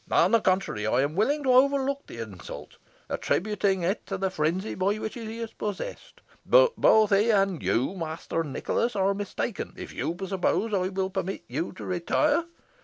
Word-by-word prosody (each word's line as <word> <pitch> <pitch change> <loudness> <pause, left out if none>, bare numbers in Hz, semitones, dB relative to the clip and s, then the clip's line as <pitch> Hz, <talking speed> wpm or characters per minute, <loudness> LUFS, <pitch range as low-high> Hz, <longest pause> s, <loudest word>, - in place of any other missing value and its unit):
On - - +4
the 230 -1 +4
contrary, 185 - 0
I 120 +4 +3
am 145 +2 0
willing 280 +10 +1
to 260 -2 +3
overlook 275 +1 +3
the - - -10
insult, 105 -6 -8 0.3
attributing 195 -2 0
it 190 +6 0
to 195 - -3
the 190 0 -1
frenzy 175 +5 -1
by 195 +3 0
which 220 0 -4
he 225 -1 -6
is 230 -1 -5
possessed. 210 - -6 0.2
But - - +5
both 215 -1 +5
he 205 +3 +4
and 195 -5 +2
you, 130 +10 +1
Master 165 -2 -3
Nicholas, 215 - -1
are 195 0 +2
mistaken 205 +2 -4
if - - -8
you 170 - -3
suppose 200 +3 0
I 185 -2 +1
will 190 0 -2
permit 190 0 -3
you 150 +8 -3
to - - -9
retire. 290 - +1
195 Hz, 180 wpm, -27 LUFS, 175-225 Hz, 0.3 s, But